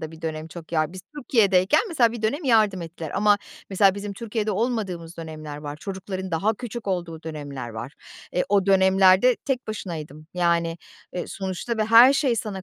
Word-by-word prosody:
da 160 - -6
bir 160 0 -14
dönem 160 0 -4
çok 170 0 -11
yardım 155 0 +1
Biz 185 - -8 0.2
Türkiye'deyken 210 -2 +3
mesela 245 - +3
bir 235 -2 -7
dönem 285 +9 -1
yardım 215 -7 +3
ettiler 165 -2 -7
ama 205 0 +4 0.3
mesela 195 0 +4
bizim 200 0 -5
Türkiye'de 220 0 -3
olmadığımız 195 -6 -2
dönemler 155 -2 -7
var, 145 0 -7
çocukların 190 +2 -6
daha 200 +7 +1
küçük 235 -2 -7
olduğu 170 -3 -3
dönemler 145 -6 -6
var. 115 +4 -7 0.4
E, 180 - +2
o 200 -1 +2
dönemlerde 190 +4 +5
tek 265 -3 -3
başınaydım. 155 -8 -6
Yani, 170 -1 +1 0.3
e, 180 - -4
sonuçta 195 +4 -4
ve 215 - +1
her 230 +4 +8
şey 270 -4 +1
sana 205 -3 -4
190 Hz, 175 wpm, -24 LUFS, 165-220 Hz, 0.4 s, her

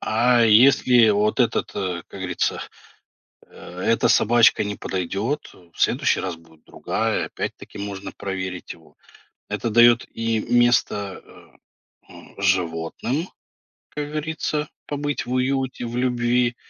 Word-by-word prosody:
А 120 +2 +3
если 120 +1 +5
вот 105 +1 +1
этот, - - 0
э, 90 -3 -3
как 95 - -11
говорится, 90 -2 -2 0.9
э, 90 +1 -12
эта 115 - +2
собачка 115 -1 +4
не 105 - -3
подойдет, 100 - -3
э, 85 -2 -21
в - - -14
следующий - - +2
раз 95 -2 -3
будет 80 -1 -22
другая, - - -2
опять-таки - - -7
можно 100 -1 -6
проверить 95 -2 -5
его. - - -19 0.5
Это 115 - -2
дает 120 +2 +5
и 115 -1 -1
место, 120 -4 +1
э, - - -17 0.6
м, - - -15
животным, 95 - -1 0.6
как 145 0 -5
говорится, 155 0 -3 0.2
побыть 145 -1 -3
в 125 - -7
уюте, 130 -1 -1
в 120 +1 -5
любви 120 -1 +1
115 Hz, 130 wpm, -22 LUFS, 95-125 Hz, 0.9 s, если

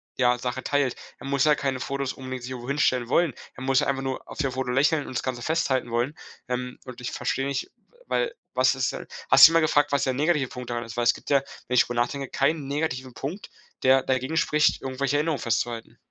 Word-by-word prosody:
ja, 125 -1 +3
Sache 125 +1 -3
teilt. 145 -3 +1 0.2
Er - - -10
muss 140 -1 +2
ja 150 -1 +5
keine 135 -2 -2
Fotos 140 0 -3
unbedingt 130 -1 -7
sich 125 - -6
irgendwo 125 0 -6
hinstellen 130 -4 +1
wollen. 170 -3 +3 0.2
Er 130 - -8
muss 135 0 +3
einfach 135 -1 0
nur 130 -1 -4
auf - - -9
dem 140 -4 0
Foto 130 -1 -2
lächeln 140 +3 +2
und 130 - -8
das - - -2
Ganze 130 -2 -3
festhalten 130 -4 0
wollen. 120 +5 0 0.3
Ähm, 125 0 -3
und 125 -1 -9
ich 125 - -4
verstehe 135 - -1
nicht, 140 -1 -3 0.4
weil - - 0 0.2
was - - +3
ist - - 0
denn - - -7 0.2
hast - - +10
du 165 - -1
mal 165 - +5
gefragt, 145 -2 +2
was 140 -1 +2
der 130 - +1
negative 145 -1 +1
Punkt 125 -1 -8
daran 120 0 -2
ist, 115 0 -9
weil 120 - +1
es 115 - +5
gibt - - -11
ja, 140 -1 +4 0.3
wenn 125 - -1
ich 125 - +6
drüber 120 -1 -1
nachdenke, 135 +3 -2
keinen 140 +1 0
negativen 135 -3 -2
Punkt, 165 - -6 0.3
der 130 0 +5
dagegen 130 +4 -1
spricht, 150 -2 +2
irgendwelche 135 +1 -1
Erinnerungen 150 -1 0
festzuhalten. 115 0 -2
130 Hz, 230 wpm, -25 LUFS, 125-145 Hz, 0.4 s, hast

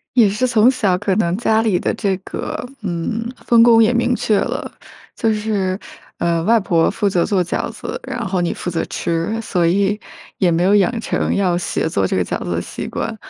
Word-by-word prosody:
也 230 -5 +6
是 215 +6 0
从 230 0 +4
小 210 -9 +1
可 195 +1 -1
能 175 -4 +1
家 220 -1 +2
里 210 -6 +1
的 - - -1
这 200 -3 0
个， 195 +5 -6 0.2
嗯， 210 +5 -3 0.2
分 235 -1 +5
工 230 -1 +7
也 225 +3 +3
明 240 +1 +1
确 215 -3 +1
了， - - -3 0.4
就 225 -1 +1
是， 205 -3 -1 0.4
呃， 170 -1 0
外 230 +4 +4
婆 170 -5 +2
负 205 - -1
责 180 -3 +2
做 190 -3 +1
饺 175 - -3
子， - - -6
然 240 -3 -4
后 185 -1 -1
你 175 - 0
负 - - -5
责 165 - -1
吃， 170 +7 -2
所 175 -6 0
以 200 +4 +1 0.4
也 185 -3 +3
没 170 +1 +1
有 195 +3 +4
养 225 +4 +2
成 - - -1
要 185 -3 +1
学 175 -2 -1
做 100 -11 0
这 - - -2
个 90 - +2
饺 - - -3
子 90 - -4
的 85 0 -1
习 - - -6
惯。 - - -4
200 Hz, 230 characters per minute, -19 LUFS, 175-225 Hz, 0.4 s, 工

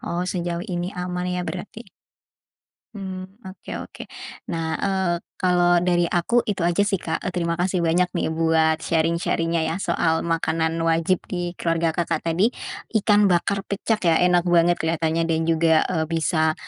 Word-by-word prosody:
Oh, 175 +1 -3
sejauh 175 -1 -3
ini 175 -3 -3
aman 180 0 -3
ya, 180 0 -2
berarti? 190 +5 -7 1.0
Mmm. 190 -2 -6 0.2
Oke 185 - -11
oke. - - -9 0.5
Nah, 160 -1 -2
eee, 190 -3 0 0.3
kalau 175 -1 +3
dari 175 -1 +2
aku, 180 +8 +1
itu 200 -4 -2
aja 175 +4 +2
sih, 195 -3 -1
Kak, - - -3
eee, 180 - -2
terima 170 -1 -1
kasih 180 0 0
banyak 170 +2 +3
nih, - - -1
buat 160 0 +2
sharing-sharing-nya, 165 0 0
ya 160 +1 -1
soal 160 -1 +1
makanan 165 -1 0
wajib 165 +2 +2
di 175 -1 -4
keluarga 165 0 0
Kakak 170 +1 -1
tadi, 180 +8 +1 0.5
ikan 205 0 +4
bakar 195 +2 +1
pecak, 210 0 -1
ya? 165 -1 +4
Enak 180 0 +3
banget 175 0 +4
kelihatannya, 165 0 0
dan 165 -1 0
juga, 160 -1 +4
eee, 160 -3 0
bisa 160 -1 +1
175 Hz, 160 wpm, -23 LUFS, 165-180 Hz, 1.0 s, ikan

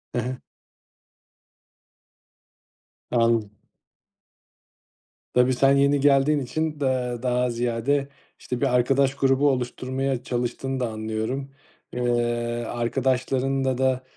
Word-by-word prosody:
Hı 120 - +1
hı. 130 +2 -4 2.7
Anladım. 115 -3 +2 1.8
Tabii 125 +1 +4
sen 135 +2 +4
yeni 140 +1 +3
geldiğin 145 +1 +4
için 150 +3 -3
da 125 -3 -1
daha 125 0 +1
ziyade, 120 +4 0 0.3
işte, 125 +1 -5
bir - - +3
arkadaş 135 +2 +2
grubu 135 +1 +3
oluşturmaya 130 0 -2
çalıştığını 125 +2 -3
da 125 - -1
anlıyorum. 110 +5 -4 0.4
Eee, 125 - -3 0.7
arkadaşlarınla 130 +2 0
da 130 -1 +1
130 Hz, 95 wpm, -24 LUFS, 120-135 Hz, 2.7 s, Tabii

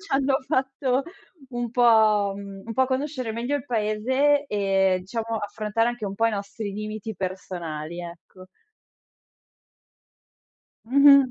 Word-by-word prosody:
ci 400 - -10
hanno 270 0 +3
fatto 265 -2 0 0.5
un 240 -1 -3
po', 220 -4 +4
mhmm, 200 -1 -9
un 230 - -4
pò 260 +2 +3
conoscere 260 -2 -2
meglio 240 +6 -1
il 285 - -6
paese 255 +6 +1
e 195 -4 +1
diciamo 225 +1 -3
affrontare 215 +2 -1
anche 240 -2 -4
un 195 -1 -3
po' 225 +3 +2
i - - +2
nostri 205 +1 -4
limiti 215 +1 -5
personali, 175 -3 -5
ecco. 175 +2 -11 2.4
Mh-mh. 280 -1 +7
225 Hz, 125 wpm, -25 LUFS, 200-260 Hz, 2.4 s, Mh-mh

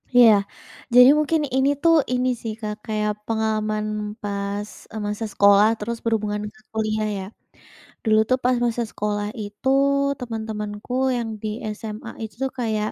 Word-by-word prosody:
Iya, 245 -2 +7 0.6
jadi 250 +1 +10
mungkin 305 +1 +1
ini 265 +1 +3
tuh 335 -1 +6 0.2
ini 250 +1 +1
sih 225 -2 -3
Kak 210 -1 -3
kayak 210 -1 0 0.2
pengalaman 215 -1 0 0.4
pas, 200 0 -3 0.2
eee, 220 - -5
masa 210 +2 -3
sekolah 200 +1 +6
terus 235 +2 -3
berhubungan 210 -2 0
ke - - -20
kuliah 215 -1 0
ya. - - -5 0.8
Dulu 215 -1 +4
tuh 255 - +4
pas 250 0 +3
masa 240 0 0
sekolah 205 0 -2
itu 210 +5 -3 0.5
teman-temanku 220 -2 -5 0.2
yang 235 -2 -3
di 220 - -3 0.3
SMA 215 -1 -7
itu 220 - -7
tuh 265 - -1
kayak 215 -3 0
215 Hz, 150 wpm, -23 LUFS, 210-235 Hz, 0.8 s, jadi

